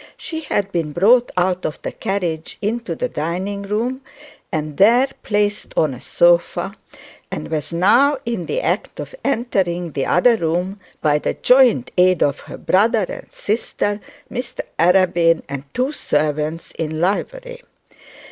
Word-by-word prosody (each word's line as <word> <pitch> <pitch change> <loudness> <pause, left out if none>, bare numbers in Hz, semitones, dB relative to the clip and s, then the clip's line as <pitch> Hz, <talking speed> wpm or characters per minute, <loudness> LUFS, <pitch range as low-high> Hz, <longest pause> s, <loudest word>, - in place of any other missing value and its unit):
She 320 0 -5
had 205 -10 -2
been 165 -4 -2
brought 235 +8 +4
out 180 0 +1
of 150 - -3
the - - -3
carriage 175 -5 -3
into 215 -4 -2
the - - -1
dining 185 +6 -3
room 225 +6 -2 0.5
and 155 -4 -3
there 235 +7 +5
placed 205 -1 -1
on 155 -4 +2
a 125 - -10
sofa, 175 +2 +2 0.5
and - - -6
was 155 0 -2
now 240 +12 +4
in 230 -7 -3
the - - -1
act - - -2
of - - -6
entering 190 - 0
the 140 -2 -2
other 230 +6 +4
room, 180 +3 -1 0.2
by 150 -1 +3
the - - -2
joint 250 - +4
aid 185 -1 +5
of 140 -2 0
her - - -10
brother 215 +2 +2
and - - -8
sister, 205 -1 -2 0.3
Mr 245 0 -4 0.2
Arabin, 170 -1 +4
and 140 0 -6
two 255 +3 0
servants 155 - -1
in 155 -1 -2
livery. - - -2
185 Hz, 145 wpm, -20 LUFS, 165-230 Hz, 0.5 s, there